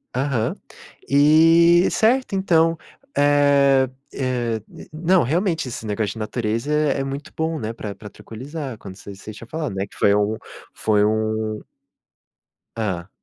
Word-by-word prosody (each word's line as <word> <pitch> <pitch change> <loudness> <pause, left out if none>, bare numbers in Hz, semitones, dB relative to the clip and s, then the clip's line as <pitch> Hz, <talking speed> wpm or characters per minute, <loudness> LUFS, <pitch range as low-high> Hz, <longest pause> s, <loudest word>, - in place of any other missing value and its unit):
Aham. 130 -4 0 0.5
E, 165 +4 +5
certo, 245 0 +2
então, 165 -4 +2 0.4
eh 140 -2 +4 0.2
eh, 120 -4 -2 0.3
não, 175 +3 +3
realmente, 165 - 0
esse 115 -2 -6
negócio 105 -1 -2
de - - -12
natureza 115 +4 -2
é 150 -2 +1
é - - -1
muito 140 +3 -6
bom, 160 0 -2
né, 110 0 -4
pra 105 -3 -6
pra 105 +2 -11
tranquilizar, 130 +3 -8
como 95 -3 -10
você 100 0 -10
você 105 +2 -10
tinha 115 +2 -12
falado, 150 -9 -4
não 95 - -1
é - - -6
que - - -18
foi 100 0 +4
um 105 +1 0 0.4
foi 105 -1 +1
um 110 0 -1 1.2
Hã. 95 -4 -3
130 Hz, 150 wpm, -22 LUFS, 110-155 Hz, 1.2 s, E